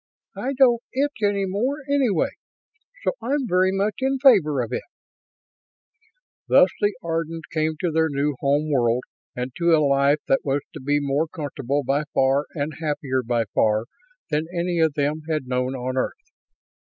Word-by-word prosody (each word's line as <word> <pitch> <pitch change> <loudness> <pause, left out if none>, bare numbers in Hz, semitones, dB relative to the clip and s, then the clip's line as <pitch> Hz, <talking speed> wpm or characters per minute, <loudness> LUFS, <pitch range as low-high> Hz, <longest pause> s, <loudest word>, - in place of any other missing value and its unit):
"I 270 +2 -3
don't 250 -3 +4
itch 280 -2 -1
any 205 -1 +1
more, 210 +9 -1
anyway, 265 - +2 0.7
so - - +2
I'm 280 -1 0
very 185 -1 +3
much 200 +2 0
in 265 +1 +1
favor 195 - +5
of 115 - -6
it." - - -1 1.7
Thus - - +6
the 205 -1 +1
Ardans 165 -1 -3
came 155 -1 0
to 175 - 0
their 160 0 +2
new 145 0 -1
home 145 +2 +1
world 120 -2 +2 0.3
and 125 +1 -3
to 170 -1 +4
a 155 -2 +3
life 140 +1 +3
that 135 - +2
was 140 0 0
to - - -8
be 145 +2 +1
more 145 +3 0
comfortable 145 -2 -3
by 140 +4 0
far 135 +2 +3
and 145 -1 -3
happier 145 -4 -1
by 120 -1 0
far 110 +1 +2 0.5
than 155 +2 0
any 175 -1 -1
of 160 -3 +2
them 150 +2 0
had 155 -4 -1
known 125 +1 -1
on 130 0 -3
Earth. 130 - -1
155 Hz, 170 wpm, -23 LUFS, 140-185 Hz, 1.7 s, Thus